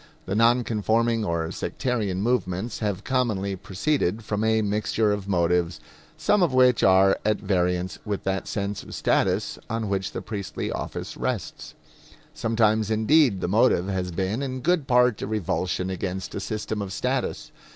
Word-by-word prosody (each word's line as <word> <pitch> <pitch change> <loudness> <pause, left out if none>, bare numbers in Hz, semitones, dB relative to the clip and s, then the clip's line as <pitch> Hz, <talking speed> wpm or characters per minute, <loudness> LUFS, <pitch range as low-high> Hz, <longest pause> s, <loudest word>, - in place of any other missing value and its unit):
The 95 - -3
non 120 +3 +4
conforming 115 +1 +1
or 85 -3 -1
sectarian 105 -7 -2
movements 110 -2 -1
have 105 -2 -2
commonly 110 -7 0
proceeded 105 +3 -1
from 105 0 -1
a 110 0 +2
mixture 105 +1 +1
of 100 -1 -3
motives, 85 -2 +1 0.4
some 210 -1 +2
of 165 -7 +2
which 125 -2 +5
are 95 +1 +5
at 110 0 +2
variance 90 -2 0
with 105 -2 -3
that 95 0 -2
sense 100 0 -3
of - - -9
status - - +1
on 110 -2 -2
which 95 -1 -1
the - - -5
priestly 105 -3 -4
office - - -5
rests. - - -4 0.6
Sometimes, 110 -1 +1
indeed, 110 0 +3
the - - -1
motive 100 -2 +3
has 95 -2 -2
been 95 +7 -2
in 130 -2 -4
good 165 -2 +1
part 125 -3 +3
a - - -3
revulsion 95 -2 -1
against 95 0 -4
a - - -3
system 105 +1 -3
of 100 -2 -5
status. 130 +5 -2
105 Hz, 160 wpm, -25 LUFS, 95-115 Hz, 0.6 s, which